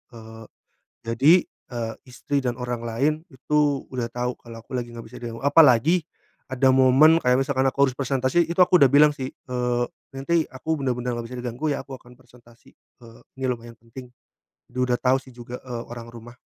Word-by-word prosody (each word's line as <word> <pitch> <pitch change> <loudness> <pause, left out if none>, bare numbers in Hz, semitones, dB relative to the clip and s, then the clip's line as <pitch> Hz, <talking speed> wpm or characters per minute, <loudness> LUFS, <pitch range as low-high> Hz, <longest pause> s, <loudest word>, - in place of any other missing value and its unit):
Eee, 110 0 -11 0.6
jadi, 115 +8 +4
eee, 115 -2 -7
istri 140 +3 -2
dan 125 -2 -2
orang 125 -1 -4
lain 135 +7 +1 0.2
itu 145 0 0
udah 120 -2 -3
tahu 125 +1 -3
kalau 115 -1 -11
aku - - -42
lagi 120 -1 -3
nggak 115 - -8
bisa 125 +3 -12
diganggu. 115 -1 -7
Apalagi, 150 +3 +5 0.5
ada 130 0 +2
momen 135 +5 +5
kayak 125 0 +3
misalkan 135 -1 +1
aku 140 +1 +2
harus 130 - +1
presentasi 135 +3 +1
itu 170 - -4
aku 180 -1 +3
udah 140 - +7
bilang 150 +3 +5
sih, 130 -3 -5
eee, 125 -2 -2 0.3
"Nanti 160 +4 0
aku 155 +4 -3
bener-bener 125 -2 -2
nggak 120 -1 -5
bisa 125 - -8
diganggu 125 +5 -4
ya - - -4
aku 135 - -12
akan 125 0 -17
presentasi, 120 -2 -21
eee, 115 -2 -19 0.2
ini 130 - -6
lumayan 115 -1 -10
penting." 115 +3 -12 0.6
Dia 125 - -6
udah 125 -1 +1
tahu 130 +1 +2
sih 130 - -16
juga, 120 0 -9
eee, 120 -2 -6
orang 115 -1 -9
rumah. 120 +1 -12
125 Hz, 190 wpm, -24 LUFS, 120-135 Hz, 0.6 s, udah